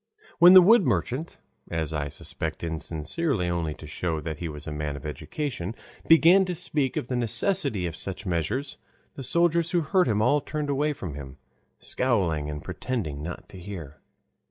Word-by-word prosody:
When 175 +2 +9
the 185 -1 +10
wood 225 +3 +6
merchant, 145 +1 -1 0.3
as 80 -2 -2
I 75 -2 -1
suspect 70 - -5
insincerely 85 - -2
only 85 -3 -2
to 80 - -11
show 80 +1 -2
that 80 -1 -5
he 85 - -3
was 75 0 -9
a 80 - -5
man 75 -1 -3
of 70 - -9
education, 110 - -4 0.3
began 170 +4 +7
to 180 -1 -3
speak 150 -5 -1
of - - -2
the 125 - -2
necessity 120 - +1
of 85 -2 -4
such 95 +5 -6
measures, 95 - -2 0.4
the - - -8
soldiers 170 +4 +2
who 175 0 +2
heard 180 +3 +2
him 105 -3 +1
all 135 +7 +3
turned 150 0 -3
away 150 +2 +1
from 95 - -6
him, 70 -2 -9 0.4
scowling 90 - 0
and 75 -1 -6
pretending 90 - -4
not 85 +3 -7
to 95 - -11
hear. 85 -6 -8
100 Hz, 180 wpm, -26 LUFS, -, 0.4 s, the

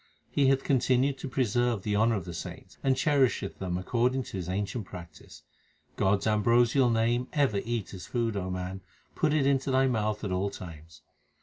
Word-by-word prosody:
He 140 -2 +3
hath 135 0 +3
continued 130 +1 +2
to 140 - -5
preserve 120 -4 0
the 105 -1 0
honour 110 +2 +3
of 95 -5 -4
the 85 - -6
saints, 85 - -8
and 130 -1 +2
cherish 135 -2 +2 0.2
them 90 -2 -2
according 125 +7 0
to 100 - -7
His 90 -1 -5
ancient 100 +3 -2
practice. 85 -3 -11 0.5
God 95 +1 +2
s - - -5
ambrosial 120 +4 +3
name 120 +2 +1
ever 130 -9 +2
eat 115 -4 -3
as 95 - -8
food, 115 -2 -1
man; 95 -1 -4 0.3
put 155 -4 +1
it 150 -2 +2
into 135 -1 +1
thy 130 0 +3
mouth 110 -4 -1
at 100 - -2
all 95 +2 0
times. 80 -4 -11
115 Hz, 185 wpm, -28 LUFS, 95-130 Hz, 0.5 s, He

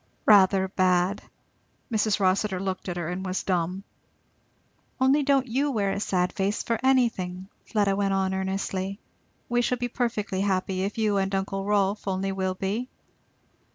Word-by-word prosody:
'Rather 195 -2 +5
bad'! 185 0 +1 0.7
Mrs. 215 -1 +1
Rossitur 190 0 +1
looked 190 0 -3
at 175 - -4
her, 170 -2 -3
and 180 +2 -4
was 185 0 -2
dumb. 180 +1 -1 1.2
"Only 265 +3 +4
don't 275 -2 +2
you 270 +4 0
wear 205 -7 0
a - - -2
sad 180 -3 0
face 200 +2 -1
for 230 -1 -1
anything!" 200 -8 +1 0.2
Fleda 205 -3 +1
went 200 0 0
on 190 0 +1
earnestly; 190 +1 -2 0.5
"we 240 0 +1
shall 250 +1 0
be 245 0 -2
perfectly 220 -5 -2
happy 190 -1 0
if 200 +3 -3
you 215 -2 +1
and 195 0 0
uncle 195 0 -2
Rolf 205 0 +1
only 195 0 -1
will 190 -1 -2
be." 210 +7 -3
195 Hz, 155 wpm, -26 LUFS, 190-215 Hz, 1.2 s, Rather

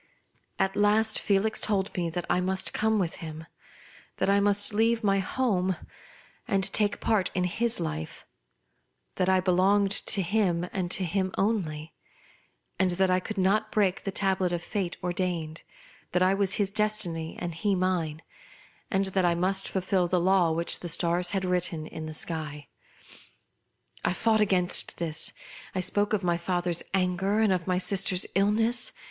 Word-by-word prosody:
At 195 0 0
last 215 +2 +3
Felix 205 +2 +1
told 200 -2 -1
me 175 -3 -1
that 175 +1 -4
I 180 - +1
must 190 +1 0
come 220 0 +1
with 180 -5 -2
him; 160 -1 -8 0.7
that 195 - +1
I 200 - +4
must 205 +1 +5
leave 225 +2 +1
my 195 -1 +2
home, 190 -3 0 0.7
and 195 -1 +1
take 205 -1 +2
part 210 -5 +1
in 180 - +1
his 225 +6 0
life; 80 0 -5 0.9
that 185 0 +1
I 190 0 +4
belonged 190 +2 +2
to 200 -1 +1
him 180 -2 0
and 185 -3 -2
to 190 - +2
him 185 +2 -1
only, 165 -7 -2 0.9
and 190 -1 +3
that 190 -1 +2
I 185 - +3
could 210 +3 -7
not 210 +3 +1
break 195 -3 +1
the - - -3
tablet 190 -2 0
of 175 -1 -2
a - - -11
fate 190 -5 -3
ordained; 175 -3 -3 0.5
that 180 - +3
I 185 +1 +3
was 195 -1 +1
his 200 -2 0
destiny, 210 -7 0
and 175 -1 -4
he 195 +5 0
mine, 175 -4 -1 0.7
and 195 0 +1
that 190 - +2
I 175 -1 +2
must 190 +3 0
fulfil 185 -1 0
the 180 +1 +1
law 180 -1 +3
which 170 +1 -1
the 175 - -6
stars 175 +2 +2
had 190 -1 -1
written 180 -3 -1
in 155 0 -7
the 155 - -7
sky. 150 -3 -4 1.3
I - - +1
fought 220 +2 +1
against 185 -3 +1
this. 160 -2 0 0.4
I - - 0
spoke 205 +3 0
of 210 -3 0
my 175 -1 +1
father's 175 -1 0
anger, 190 +2 0
and 215 -3 +3
of 180 -1 -3
my 180 -1 +1
sister's 185 -1 +2
illness. 225 +5 +2
185 Hz, 170 wpm, -27 LUFS, 175-200 Hz, 1.3 s, must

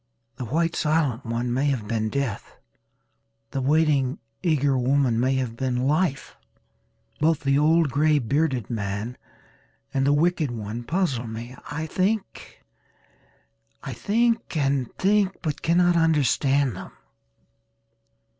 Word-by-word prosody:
The 125 - -4
white 165 +7 0
silent 150 -6 0
one 120 +1 -1
may 135 +3 +1
have 125 -7 -1
been 110 0 -1
Death. 140 -3 -4 0.9
The 135 - -2
waiting 140 -2 +2 0.2
eager 145 -6 +2
woman 130 -2 +2
may 130 +2 +2
have 125 -3 -2
been 125 0 -1
Life. 150 -1 0 0.8
Both 160 0 +2
the 140 0 +2
old 160 0 +3
grey 150 +2 +3
bearded 135 -2 0
man 105 +1 -3 0.8
and 135 - +1
the - - +4
wicked 160 0 +2
one 115 0 -5
puzzle 140 -7 -1
me. 115 +3 -7
I 155 +2 -3
think 195 +5 -3 1.2
and 180 - 0
think 200 0 +2
but 150 -3 -3
cannot 175 +1 +3
understand 140 - +2
them. 95 - -9
140 Hz, 115 wpm, -24 LUFS, 125-160 Hz, 1.2 s, the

